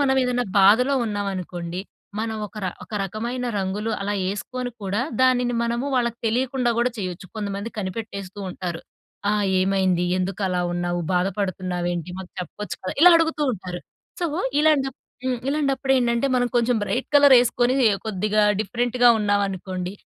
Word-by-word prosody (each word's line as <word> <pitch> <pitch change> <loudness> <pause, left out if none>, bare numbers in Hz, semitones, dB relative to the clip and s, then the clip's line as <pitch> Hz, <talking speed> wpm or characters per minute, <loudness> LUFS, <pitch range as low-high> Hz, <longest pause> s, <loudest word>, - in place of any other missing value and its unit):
మనవేదన్నా 255 -3 +2
బాధలో 225 +8 +5
ఉన్నావనుకోండి, 185 -4 -4 0.4
మనం 220 0 -2
ఒక‌ 205 - -20
ర - - +1 0.2
ఒక - - -20
రకమైన 235 +6 -4
రంగులు 200 +3 -2
అలా 205 +1 -1
యేసుకోని 245 +5 -4
కూడా, 200 +5 0 0.2
దానిని 245 -2 +3
మనము 235 +3 -1
వాళ్ళకు 235 -1 0
తెలియకుండా 250 +1 +1
కూడా 245 0 +1
చెయొచ్చు. 185 -1 -5
కొంతమంది 205 +1 -4
కనిపెట్టేస్తూ 200 0 -5
ఉంటారు. 175 -2 -5 0.5
ఆ! - - +2 0.3
"ఏమైంది? 185 -2 +2
ఎందుకలా 185 -1 -1
ఉన్నావు? 175 0 -1
బాధపడుతున్నావేంటి? 180 -2 -1
మాకు 185 -1 -9
చెప్పచ్చు 210 +4 -6
కదా?" - - -3
ఇలా 360 0 +10
అడుగుతూ 320 -2 0
ఉంటారు. 180 -4 -6 0.4
సో, 345 - +1 0.3
ఇలాంటప్ 280 -4 +2 0.3
హ్మ్. 260 -1 0
ఇలాంటప్పుడేంటంటే, 270 -4 +1
మనం 245 0 +2
కొంచెం 240 0 +2
బ్రైట్ 250 +5 -2
కలరేసుకొనీ 250 -3 +5 0.3
కొద్దిగా 210 +1 +1 0.2
డిఫరెంట్‌గా 245 +3 +2
ఉన్నావనుకోండి, 195 -3 -1
210 Hz, 130 wpm, -23 LUFS, 185-245 Hz, 0.5 s, ఇలా